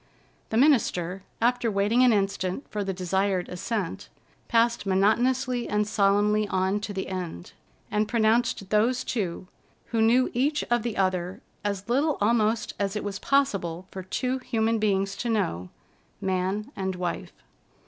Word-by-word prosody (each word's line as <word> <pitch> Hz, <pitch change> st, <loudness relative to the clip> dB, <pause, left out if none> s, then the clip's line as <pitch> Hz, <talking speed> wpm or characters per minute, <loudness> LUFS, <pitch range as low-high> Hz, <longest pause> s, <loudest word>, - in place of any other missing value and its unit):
The 220 Hz, -, 0 dB
minister, 195 Hz, -, +2 dB, 0.2 s
after 245 Hz, 0 st, +2 dB
waiting 210 Hz, +4 st, +2 dB
an 250 Hz, -1 st, +6 dB
instant 195 Hz, +2 st, -1 dB
for 210 Hz, -1 st, -2 dB
the 195 Hz, -, -2 dB
desired 190 Hz, 0 st, 0 dB
assent, 185 Hz, 0 st, -4 dB, 0.4 s
passed 230 Hz, -2 st, +2 dB
monotonously 240 Hz, +6 st, +2 dB
and 210 Hz, 0 st, +1 dB
solemnly 210 Hz, 0 st, +2 dB
on 190 Hz, +2 st, 0 dB
to 205 Hz, 0 st, -5 dB
the 190 Hz, -1 st, -4 dB
end, 180 Hz, -, -5 dB, 0.4 s
and 210 Hz, 0 st, +1 dB
pronounced 225 Hz, -3 st, +1 dB
those 235 Hz, +4 st, +2 dB
two, 185 Hz, -6 st, -3 dB, 0.4 s
who 230 Hz, -2 st, +1 dB
knew 240 Hz, +3 st, +4 dB
each 290 Hz, +5 st, +1 dB
of 240 Hz, -1 st, +3 dB
the 235 Hz, -1 st, -4 dB
other 185 Hz, -1 st, -1 dB, 0.2 s
as 200 Hz, -1 st, -3 dB
little 280 Hz, +5 st, +1 dB
almost 220 Hz, +1 st, +1 dB
as 200 Hz, 0 st, -1 dB
it 210 Hz, -, -2 dB
was 200 Hz, -1 st, -4 dB
possible 195 Hz, -11 st, 0 dB
for 190 Hz, -, -6 dB
two 255 Hz, +8 st, -2 dB
human 225 Hz, -3 st, 0 dB
beings 195 Hz, -2 st, +1 dB
to 240 Hz, -, -3 dB
know, 170 Hz, -, -1 dB, 0.5 s
man 190 Hz, +3 st, -1 dB
and 190 Hz, -1 st, -2 dB
wife. 180 Hz, -1 st, -4 dB
210 Hz, 150 wpm, -26 LUFS, 190-235 Hz, 0.5 s, an